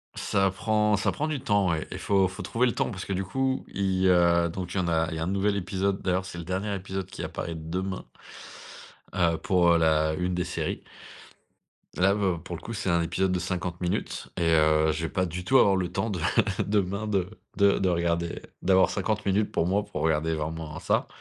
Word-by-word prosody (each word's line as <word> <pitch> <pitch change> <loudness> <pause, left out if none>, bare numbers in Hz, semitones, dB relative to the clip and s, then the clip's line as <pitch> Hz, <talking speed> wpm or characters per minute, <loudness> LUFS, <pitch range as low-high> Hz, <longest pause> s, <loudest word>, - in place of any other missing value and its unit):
Ça 95 0 +1
prend 105 +1 +1
ça 100 - +1
prend 155 - -2
du 150 -3 -2
temps 100 -6 +2
ouais 80 -2 -1
et - - -4
faut 95 -2 +3
faut 95 +1 -8
trouver 115 +7 +1
le 120 - +1
temps - - -1
parce 95 -1 -6
que 95 - -3
du 95 +1 -1
coup 130 +7 -1
il, 95 -1 0
heu, 85 -1 +4
donc 90 +1 -5
il - - -3
y - - +3
en 90 - 0
a 80 -1 +1
il - - -4
y - - -4
a - - -1
un - - -2
nouvel 100 +2 +1
épisode, 95 +1 -1
d'ailleurs 90 0 0
c'est 85 -1 -7
le 85 - -5
dernier 95 +4 -2
épisode 95 0 -4
qui 95 - -8
apparaît 85 - -4
demain 90 +4 -4 1.1
heu, 85 -3 +2
pour, 90 -4 +2
heu, 85 - +5
la 80 -1 +3
une 90 +2 -1
des 90 - 0
séries. 90 - -3 1.2
Là 95 +2 +4
bah, 95 -5 0
pour 90 - -6
le 85 - -9
coup 115 - -6
c'est 105 -3 -2
un 85 0 +3
épisode 95 +3 0
de 90 - 0
50 90 0 -3
minutes 90 - -3
et 85 -1 +2
heu, 80 0 +4
je 80 +1 -3
vais 80 - -1
pas 95 +3 0
du 90 +1 -5
tout 130 +8 +4
avoir 100 -6 +5
le 90 -2 -1
temps 100 +4 -1
de 90 - -3 0.4
demain 100 0 0
de 95 -4 0 0.3
de 100 -1 +4
de 95 - +2
regarder, 85 -1 -1 0.2
d'avoir 95 0 +4
50 105 +2 -1
minutes 100 +2 +1
pour 85 - +1
moi 100 +4 +1
pour 105 - -6
regarder 80 0 +1
vraiment 80 0 -5
ça, - - 0
90 Hz, 230 wpm, -27 LUFS, 85-100 Hz, 1.2 s, heu